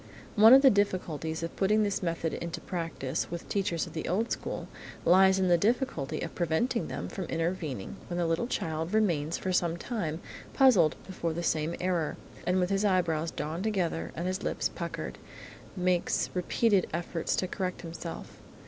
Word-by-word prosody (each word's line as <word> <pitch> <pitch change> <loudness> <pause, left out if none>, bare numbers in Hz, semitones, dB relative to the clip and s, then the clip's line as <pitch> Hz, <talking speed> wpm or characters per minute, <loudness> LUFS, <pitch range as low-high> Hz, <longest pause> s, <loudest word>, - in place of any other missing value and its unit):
One 220 +4 +9
of 270 - +6
the 270 - +8
difficulties 165 -5 -1
of 165 - -4
putting 210 +2 +3
this 200 -2 -1
method 165 -2 -1
into 170 -1 -4
practice 165 -7 -3
with 170 0 -6
teachers 190 -5 0
of - - -11
the 160 - -4
old 215 +7 0
school, - - -3 0.4
lies 190 +2 +6
in 190 -1 +2
the 175 -1 +4
difficulty 220 - 0
of - - -4
preventing 180 +9 0
them - - -4
from 190 - -5
intervening 165 - -3
when 175 - -3
the 175 - +1
little 165 +8 0
child 160 -3 -2
remains 170 -7 +1
for 185 - -2
some 170 -1 +1
time 170 -7 -3 0.4
puzzled 200 - +5
before 170 -3 -3
some 160 0 0
error, 175 -4 0 0.3
and 180 +1 +3
with 180 +1 +1
his 195 +1 +1
eyebrows 170 -5 +2
drawn 155 +3 -4
together 190 -6 -1
and 170 - -3
his 185 +1 -1
lips - - -1
puckered, - - -5 0.6
makes 180 -1 +1
repeated 190 +2 +2
efforts 170 0 -2
to 185 - 0
correct 185 -1 -3
himself. 165 -1 -7
175 Hz, 170 wpm, -29 LUFS, 165-195 Hz, 0.6 s, One